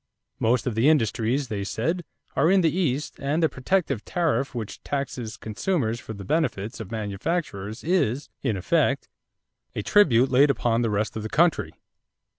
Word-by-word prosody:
Most 115 +1 +2
of 125 - -1
the 115 +7 +4
industries, 125 -1 +1
they 105 -3 -3
said, 165 - -2 0.3
are 145 +5 +3
in 190 0 +5
the 165 -1 +2
East 150 -5 -1
and 145 +4 0
the - - +6
protective 135 - -1
tariff 145 -7 0
which 110 -3 -5
taxes 125 -5 -4
consumers 115 - -1
for 110 - -8
the 100 -1 -8
benefit 120 - -1
of 110 -4 -7
manufacturers 110 - -3
is, 145 - +1
in 105 - 0
effect, 90 - +1 0.7
a 105 - -2
tribute 135 - +4
laid 140 +3 +5
upon 120 -4 +1
the 115 - +1
rest 105 +1 -1
of 110 - -3
the 110 - -5
country. 165 +4 +2
125 Hz, 165 wpm, -25 LUFS, 110-155 Hz, 0.7 s, the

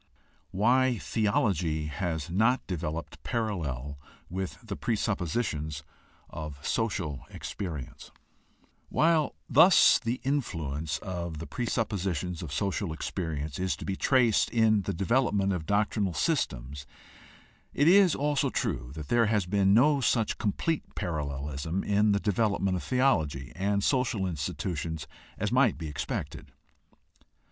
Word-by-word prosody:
WHY 125 +5 +3
THEOLOGY 100 - 0
HAS 80 0 -3
NOT 115 +8 +2
DEVELOPED 85 -3 -4
PARALLEL 75 - -3 0.3
WITH 95 0 -4
THE 105 -3 -5
PRESUPPOSITIONS 90 - -2 0.5
OF 75 -3 -6
SOCIAL 90 - -1
EXPERIENCE 80 -10 -6 0.8
While 160 -2 +2
thus - - +7
the 120 +3 -2
influence 80 - -2
of 85 -4 -4
the 80 - -6
presuppositions 95 - -2
of 80 -5 -6
social 100 +4 -1
experience 80 -3 -4
is 95 0 0
to - - -8
be 95 - -2
traced 120 -1 +3
in 110 -2 +3
the 95 - -3
development 100 -1 +1
of 85 -4 -4
doctrinal 100 -3 +1
systems, 70 - -1 0.8
it 145 - +2
is 185 -1 +6
also 145 0 +1
true - - -2
that 75 -3 -7
there 120 -2 +4
has 105 -3 +1
been 100 +1 +3
no 140 +4 +4
such 115 -3 +1
complete 130 +9 -2
parallelism 75 +1 -3
in 105 +1 +3
the 100 - +2
development 100 -2 +1
of 90 - -2
theology 80 - +1
and 100 +1 0
social 125 -6 +1
insti 85 -7 -2
tutions 80 -3 -3 0.3
as - - -1
might - - +3
be 80 -1 -5
expected. 75 -2 -5
95 Hz, 125 wpm, -28 LUFS, 80-115 Hz, 0.8 s, thus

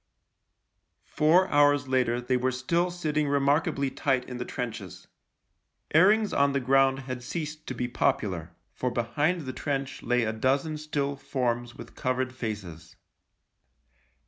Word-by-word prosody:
Four 165 +5 +3
hours 145 -1 +4
later 125 -2 +1
they 125 +1 0
were 125 +1 +1
still 170 +8 0
sitting 155 -4 -1
remarkably 140 0 +1
tight 130 -2 0
in 125 - -6
the 125 - -3
trenches. 120 -2 -6 0.9
Airings 205 +6 +5
on 140 0 +3
the 140 - +1
ground 135 +1 +3
had 130 -1 -6
ceased 155 +3 -5
to - - -4
be 125 - -2
popular 95 -8 -1
— - - -45
for 125 - -2
behind 145 +9 0
the 130 -3 -6
trench 135 -1 -3
lay 125 0 +1
a 110 0 -1
dozen 135 +7 0
still 145 -2 -2
forms 120 -3 -2
with - - -11
covered 130 0 -1
faces. 105 -9 -6
135 Hz, 145 wpm, -27 LUFS, 125-150 Hz, 0.9 s, Airings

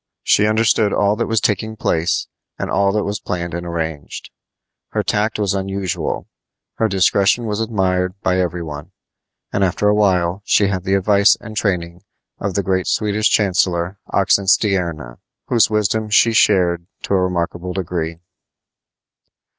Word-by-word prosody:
She 105 - +3
understood 110 -1 +2
all 105 0 +2
that 115 - -1
was 115 -1 +1
taking 110 +1 -1
place, 85 -5 0 0.3
and - - -4
all 100 0 +2
that 105 -1 0
was 105 +2 -3
planned 85 -1 -4
and 85 0 -5
arranged. 80 -3 -5 0.6
Her - - 0
tact 105 +1 0
was 100 -3 0
unusual. 95 -2 -3 0.5
Her 110 - +2
discretion 100 +3 +2
was 105 -1 -2
admired 95 -4 -1
by 90 0 +1
every 90 -1 -2
one; 75 -2 -8 0.6
and 100 - +1
after 95 +2 +1
a - - +4
while 95 -3 +1
she 100 -1 +3
had 95 -2 -3
the 95 0 +2
advice 100 +1 +4
and 110 -1 -10
training 85 -4 -2 0.4
of 100 -2 -3
the 100 - 0
great 95 0 0
Swedish 105 0 +1
chancellor, 90 -2 +1
Oxenstierna, 95 - +1 0.3
whose 115 -3 +4
wisdom 105 0 0
she 115 +2 +4
shared 90 -5 +2 0.2
to - - -2
a 95 - +3
remarkable 90 0 -2
degree. 85 -3 -3
95 Hz, 150 wpm, -19 LUFS, 90-105 Hz, 0.6 s, a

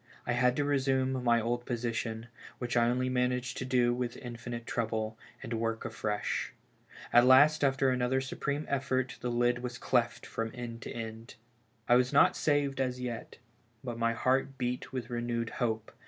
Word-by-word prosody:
I 120 - 0
had 125 +1 +3
to 145 - +1
resume 130 -2 +1
my 120 -1 +4
old 120 +2 -2
position 115 -1 -2 0.2
— - - -16
which 120 -1 -3
I 120 -1 +4
only 125 +1 0
managed 125 0 0
to 130 - -3
do 125 -2 +3
with 120 -1 -3
infinite 120 -1 -6
trouble 110 -2 -2
— - - -25
and 120 -2 -4
work 115 0 -2
afresh. 105 -1 -2 0.6
At 120 +1 +7
last, 145 +4 +6
after 135 -1 +3
another 125 +1 +1
su 130 0 -5
preme 145 +1 -2
effort, 130 -2 -1
tlie 120 -1 -2
lid 120 0 +2
was 125 0 -5
cleft 120 -2 0
from 115 0 -3
end 120 -1 -6
to - - -6
end. 115 0 -7 0.5
I 120 - +6
was 125 0 +2
not 140 - +5
saved 145 -3 +1
as 125 -1 -1
yet, 120 -3 -5 0.5
but 120 -3 -5
my 115 0 +2
heart 130 +3 +1
beat 125 0 -3
with 125 -2 -5
re 120 0 -1
newed 115 -1 -2
hope. 110 -2 -1
125 Hz, 185 wpm, -31 LUFS, 115-130 Hz, 0.6 s, At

